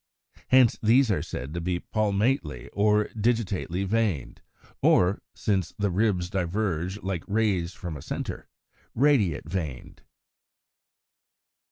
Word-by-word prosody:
Hence 130 Hz, -3 st, +5 dB
these 115 Hz, +2 st, +4 dB
are 95 Hz, -, +1 dB
said 70 Hz, +5 st, -6 dB
to 85 Hz, -, -3 dB
be 90 Hz, +1 st, -1 dB
Palmately 105 Hz, -, -1 dB
or 105 Hz, +1 st, +2 dB
Digitately 105 Hz, -5 st, -1 dB
veined, 100 Hz, -, -1 dB, 0.4 s
or 90 Hz, +3 st, +4 dB
(since 95 Hz, -5 st, -1 dB
the 100 Hz, -2 st, 0 dB
ribs 95 Hz, -2 st, +1 dB
diverge 95 Hz, 0 st, -1 dB
like 95 Hz, -3 st, -3 dB
rays 100 Hz, -5 st, 0 dB
from 85 Hz, -3 st, -6 dB
a 70 Hz, -, -8 dB
centre) -, -, -5 dB, 0.5 s
Radiate 115 Hz, -, +2 dB
veined. 80 Hz, -7 st, -5 dB
100 Hz, 115 wpm, -26 LUFS, 85-110 Hz, 0.5 s, Hence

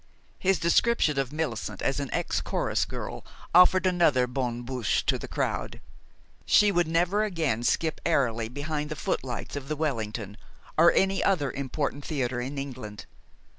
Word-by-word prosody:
His 190 Hz, 0 st, +2 dB
description 170 Hz, -4 st, +2 dB
of 135 Hz, -1 st, -1 dB
Millicent 120 Hz, -10 st, -3 dB
as 135 Hz, +1 st, 0 dB
an 140 Hz, -2 st, -3 dB
ex -, -, -1 dB
chorus -, -, 0 dB
girl -, -, -6 dB, 0.3 s
offered 185 Hz, +1 st, +6 dB
another 170 Hz, -9 st, +3 dB
bonne 125 Hz, -1 st, -3 dB
bouche 125 Hz, -4 st, -1 dB
to -, -, +1 dB
the -, -, -6 dB
crowd. -, -, -2 dB, 0.7 s
She 210 Hz, -1 st, +5 dB
would 175 Hz, -3 st, +2 dB
never 175 Hz, +6 st, +2 dB
again 160 Hz, -, -1 dB
skip 160 Hz, +6 st, 0 dB
airily 115 Hz, -8 st, +1 dB
behind 150 Hz, +3 st, -3 dB
the 155 Hz, -, -4 dB
footlights 125 Hz, -3 st, -3 dB
of 140 Hz, -1 st, -5 dB
the 155 Hz, -, -2 dB
Wellington, 110 Hz, -8 st, -3 dB, 0.4 s
or 170 Hz, +2 st, +6 dB
any 195 Hz, 0 st, +2 dB
other 155 Hz, -9 st, +1 dB
important 140 Hz, +1 st, -3 dB
theater 130 Hz, -5 st, -2 dB
in 135 Hz, +3 st, -5 dB
England. 125 Hz, -7 st, -6 dB
145 Hz, 155 wpm, -27 LUFS, 125-170 Hz, 0.7 s, offered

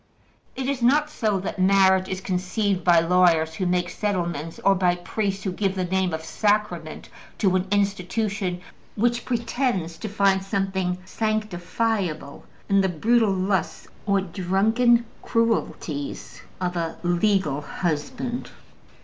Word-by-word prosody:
It 265 Hz, -, -3 dB
is 275 Hz, -1 st, -2 dB
not 295 Hz, +5 st, +3 dB
so 215 Hz, -8 st, 0 dB
that 190 Hz, -, -5 dB
marriage 190 Hz, 0 st, +4 dB
is 185 Hz, 0 st, -3 dB
conceived 185 Hz, +1 st, -1 dB
by 170 Hz, -1 st, +5 dB
lawyers 165 Hz, -2 st, +3 dB
who 185 Hz, +3 st, -2 dB
make 180 Hz, 0 st, 0 dB
settlements, 170 Hz, -6 st, -2 dB
or 195 Hz, -, +6 dB
by 180 Hz, -2 st, +2 dB
priests 195 Hz, +2 st, -3 dB
who 190 Hz, -, -1 dB
give 195 Hz, +1 st, -1 dB
the 185 Hz, -1 st, -1 dB
name 190 Hz, 0 st, 0 dB
of 160 Hz, 0 st, -4 dB
``sacrament'' 190 Hz, -4 st, -1 dB, 0.3 s
to 190 Hz, -3 st, +2 dB
an 185 Hz, +1 st, 0 dB
institution 200 Hz, -1 st, -1 dB, 0.3 s
which 240 Hz, +2 st, 0 dB
pretends 230 Hz, -8 st, -1 dB
to 215 Hz, -, -5 dB
find 195 Hz, -1 st, +2 dB
something 190 Hz, -2 st, -1 dB
sanctifiable 210 Hz, -6 st, -2 dB, 0.3 s
in 195 Hz, 0 st, +4 dB
the 190 Hz, -, +1 dB
brutal 225 Hz, +6 st, +2 dB
lusts 190 Hz, 0 st, -1 dB, 0.2 s
or 200 Hz, -1 st, +3 dB
drunken 215 Hz, +7 st, +2 dB, 0.2 s
cruelties 225 Hz, -, -2 dB, 0.2 s
of 180 Hz, -1 st, -2 dB
a 165 Hz, -1 st, -3 dB
legal 175 Hz, -4 st, +1 dB
husband. 235 Hz, -, -3 dB
190 Hz, 130 wpm, -24 LUFS, 180-215 Hz, 0.3 s, or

